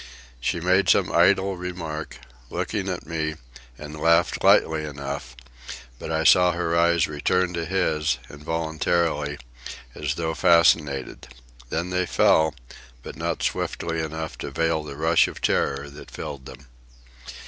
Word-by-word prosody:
She - - -1
made 90 +2 +2
some - - +3
idle 95 -1 +3
remark, 85 -4 -6 0.3
looking - - -3
at - - -4
me, 80 -1 -3 0.4
and 75 0 -9
laughed 85 +1 +3
lightly 80 -1 +4
enough; 70 -3 -6 0.6
but - - -6
I 80 0 0
saw 90 +2 +6
her 85 -1 -1
eyes 85 -1 +3
return 90 +4 0
to 85 -1 -3
his, 80 -6 0
involuntarily, 80 0 -1 0.6
as - - -3
though 80 -1 -2
fascinated; 75 -7 +2 0.4
then 85 +6 -2
they 90 -1 0
fell, 80 -1 +3 0.5
but - - -8
not - - -3
swiftly 80 -1 -2
enough 80 0 -5
to - - -5
veil 80 -1 0
the 70 -2 -8
rush 80 +2 +3
of - - -8
terror 70 +1 0
that 70 - -12
filled 70 -4 -7
them. 65 +2 -12
80 Hz, 135 wpm, -24 LUFS, 75-85 Hz, 0.6 s, saw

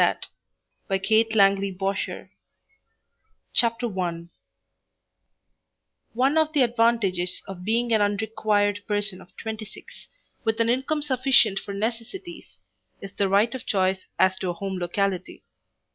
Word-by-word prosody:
Post - - +1 0.6
8vo 220 +4 +2
TO 220 - -2
LUCY 195 0 +4
BOSHER 195 0 -2
JANNEY - - -15 1.2
CHAPTER 230 -4 +1
I 170 -2 -2 1.9
One 270 +6 +2
of 310 -1 +2
the 285 -4 +4
advantages 230 -7 +1
of 185 -2 -8
being 230 +3 +1
an 220 - +4
unrequired 205 0 +1
person 205 -3 -1
of 175 - -19
twenty 220 -1 -5
six, - - -13 0.4
with 225 0 0
an 230 0 +2
income 265 +5 0
sufficient 260 -7 +3
for 200 - -7
necessities, 235 - -5 0.4
is 195 -1 -9
the 200 -1 0
right 205 +5 +3
of 260 - -7
choice 190 -1 0
as 190 0 +3
to 185 - -2
a - - -1
home 190 +1 -4
locality. 185 +1 -2
205 Hz, 135 wpm, -25 LUFS, 195-235 Hz, 1.9 s, LUCY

